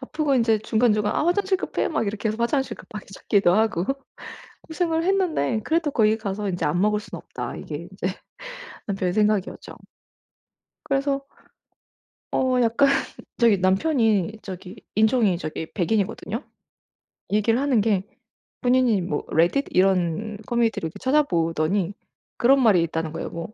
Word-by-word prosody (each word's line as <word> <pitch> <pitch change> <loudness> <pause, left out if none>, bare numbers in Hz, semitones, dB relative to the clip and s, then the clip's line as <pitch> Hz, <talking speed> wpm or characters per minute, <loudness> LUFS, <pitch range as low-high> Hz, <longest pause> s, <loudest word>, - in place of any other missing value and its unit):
아프고 295 +1 -1
인제 230 -3 +3
중간중간 215 -1 +1
"아 300 - 0
화장실 380 +2 +2
급해." - - -2
막 220 - -1
이렇게 215 +2 -2
해서 215 - -2
화장실 265 +3 0
급하게 210 -2 -10
찾기도 195 -4 +2
하고 215 -5 +1 0.8
고생을 325 0 -1
했는데 345 - +1
그래도 320 -2 0
거기 220 -3 +3
가서 205 -1 -4
인제 175 -2 -2
'안 150 +4 0
먹을 210 +1 +2
순 - - -9
없다.' - - -7
이게 - - -6 0.2
인제 - - -3 0.8
남편의 190 -3 -1
생각이었죠. 210 -2 0 1.1
그래서 275 0 -1 1.1
어 255 -1 +2
약간 235 +4 +3 0.5
저기 230 -5 +4
남편이 210 - +1
저기 185 +1 -8 0.2
인종이 220 -4 +3
저기 160 -1 -5
백인이거든요. 210 - -1 0.9
얘기를 215 +3 +2
하는 275 -5 +2
게 205 -3 +1 0.6
본인이 245 -5 +3
뭐 170 -4 -3
레딧 175 - +2
이런 190 +2 +1
커뮤니티를 230 -7 0
이렇게 160 - -11
찾아 290 +4 +3
보더니 170 - 0 0.4
그런 270 +3 +4
말이 210 -8 +5
있다는 165 -1 -3
거예요. 165 - -4
뭐 170 +5 -7
215 Hz, 325 characters per minute, -24 LUFS, 190-260 Hz, 1.1 s, 말이